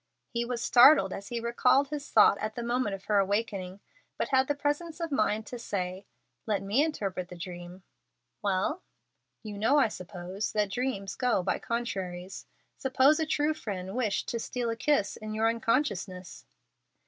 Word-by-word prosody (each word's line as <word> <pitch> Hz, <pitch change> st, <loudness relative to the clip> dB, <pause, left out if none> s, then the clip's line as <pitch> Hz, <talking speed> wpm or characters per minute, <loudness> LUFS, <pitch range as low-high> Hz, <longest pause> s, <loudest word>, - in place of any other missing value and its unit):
He 235 Hz, 0 st, 0 dB
was 240 Hz, -1 st, -3 dB
startled 245 Hz, -6 st, +7 dB
as 200 Hz, -, -7 dB
he 240 Hz, -, -3 dB
recalled 240 Hz, +4 st, +2 dB
his 295 Hz, -1 st, -5 dB
thought 205 Hz, -2 st, +6 dB
at 215 Hz, 0 st, -3 dB
the 240 Hz, -, -4 dB
moment 240 Hz, -4 st, 0 dB
of 195 Hz, 0 st, -13 dB
her 205 Hz, -1 st, +3 dB
awaking, 195 Hz, -1 st, -1 dB, 0.4 s
but -, -, -1 dB
had 265 Hz, -1 st, +3 dB
the 290 Hz, -, 0 dB
presence 295 Hz, +3 st, -2 dB
of 335 Hz, -2 st, -3 dB
mind 215 Hz, -4 st, +1 dB
to 245 Hz, +2 st, -7 dB
say, 190 Hz, -3 st, -4 dB, 0.4 s
"Let 205 Hz, -3 st, 0 dB
me 210 Hz, +9 st, +2 dB
interpret 195 Hz, -, -3 dB
the 180 Hz, -, -10 dB
dream." 175 Hz, +1 st, -8 dB, 0.6 s
"Well." 200 Hz, -, 0 dB, 0.6 s
"You 210 Hz, -2 st, -7 dB
know, 245 Hz, +8 st, +3 dB
I 265 Hz, -6 st, +4 dB
suppose, 185 Hz, +1 st, -5 dB
that 210 Hz, -2 st, +1 dB
dreams 200 Hz, -6 st, -2 dB
go 250 Hz, -7 st, +1 dB
by -, -, 0 dB
contraries. 190 Hz, -6 st, -4 dB, 0.3 s
Suppose 265 Hz, +3 st, +3 dB
a 320 Hz, -, 0 dB
true 300 Hz, 0 st, +1 dB
friend 190 Hz, -9 st, -5 dB
wished 220 Hz, -6 st, -1 dB
to 235 Hz, -, -2 dB
steal 240 Hz, 0 st, -2 dB
a -, -, -2 dB
kiss 230 Hz, -5 st, +1 dB
in 215 Hz, 0 st, -6 dB
your 220 Hz, +1 st, +2 dB
unconsciousness." 225 Hz, -6 st, -1 dB
215 Hz, 170 wpm, -29 LUFS, 195-255 Hz, 0.6 s, startled